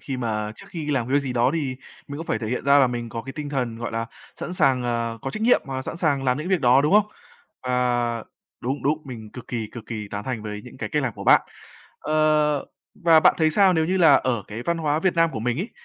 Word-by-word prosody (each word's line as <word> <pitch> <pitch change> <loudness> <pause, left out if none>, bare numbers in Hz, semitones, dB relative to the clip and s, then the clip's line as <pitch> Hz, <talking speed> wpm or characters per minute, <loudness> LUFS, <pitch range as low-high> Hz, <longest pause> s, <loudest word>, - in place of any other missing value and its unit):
khi 135 - -5
mà 110 -3 -2
trước - - -12
khi 155 -4 -4
làm 125 -5 0
cái 130 - -4
việc 145 - +4
gì 135 -2 -4
đó 120 +1 +2
thì 135 -5 -2 0.3
mình 145 +1 -6
cũng 165 - -6
phải - - -1
thể 110 - -5
hiện 125 +2 -3
ra 140 +1 +6
là 135 - +5
mình 120 -1 -4
có 115 0 -5
cái 135 - -8
tinh 150 -2 -6
thần, 125 -5 -2
gọi 115 -1 -4
là, 115 0 -2 0.3
sẵn 175 - -4
sàng, 130 -7 +2
ờ, 115 -1 -2
có 135 - -3
trách 215 - -5
nhiệm 245 - +5
hoặc 135 -2 -5
là 130 - -3
sẵn 165 - -6
sàng 145 -6 0
làm 125 +1 +1
những 155 +4 -4
việc 185 -3 +2
đó, 125 +2 +5
đúng 150 - +1
không? 210 0 +5 0.6
Và 120 -2 0 0.4
đúng, 135 +4 -3
đúng, 150 +2 +1
mình 110 -5 -9
cực 125 -2 -11
kỳ, 115 -3 -3
cực 115 -3 -9
kỳ 105 -3 -5
tán 100 0 -5
thành 120 -5 -4
với 105 -1 -6
những 125 - -12
cái - - -4
cách 150 -2 0
làm 125 -4 -1
của - - -8
bạn. - - +7 0.6
Ờ, 150 -1 +2 0.4
và 165 -2 +7
bạn - - +5
thấy 160 -1 +3
sao 190 +2 +4
nếu 160 -1 +2
như 185 +3 0
là 160 -6 +7
ở 120 -6 0
cái 110 +3 -6
văn 170 +3 0
hóa 155 -1 0
Việt 185 0 +1
Nam 165 0 +4
của 110 - -3
mình 120 +3 -1
ấy, 205 - -3
130 Hz, 280 wpm, -23 LUFS, 120-155 Hz, 0.6 s, bạn